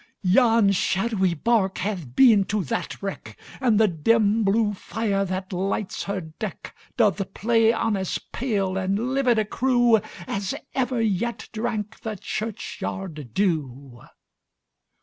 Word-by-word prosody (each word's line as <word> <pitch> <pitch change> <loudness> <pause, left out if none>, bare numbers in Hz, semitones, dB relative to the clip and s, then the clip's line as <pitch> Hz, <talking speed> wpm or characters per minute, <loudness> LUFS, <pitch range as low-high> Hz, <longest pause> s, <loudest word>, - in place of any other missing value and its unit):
Yon 225 +1 +4
shadowy 190 -1 +1
bark 195 +1 +1
hath 180 - -4
been 225 - +6
to 205 -1 -1
that 140 - -3
wreck, 195 - -6 0.2
And 235 -5 +3
the 220 - +5
dim 215 +5 +2
blue 210 +1 +2
fire, 200 0 -1
that 185 +1 -4
lights 195 +2 -2
her 200 -1 -2
deck, 160 +4 -7 0.2
Doth 200 -4 +1
play 225 +1 +3
on 225 -2 0
as 190 -2 -2
pale 200 -7 -2
and 200 +7 -1
livid 260 -4 +2
a 215 - +2
crewAs 220 -4 +1 0.2
ever 255 -2 0
yet 225 +3 -2
drank 220 -1 -3
the 220 -1 -5
churchyard 190 - -5
dew. 140 -9 -2
205 Hz, 130 wpm, -24 LUFS, 190-225 Hz, 0.2 s, been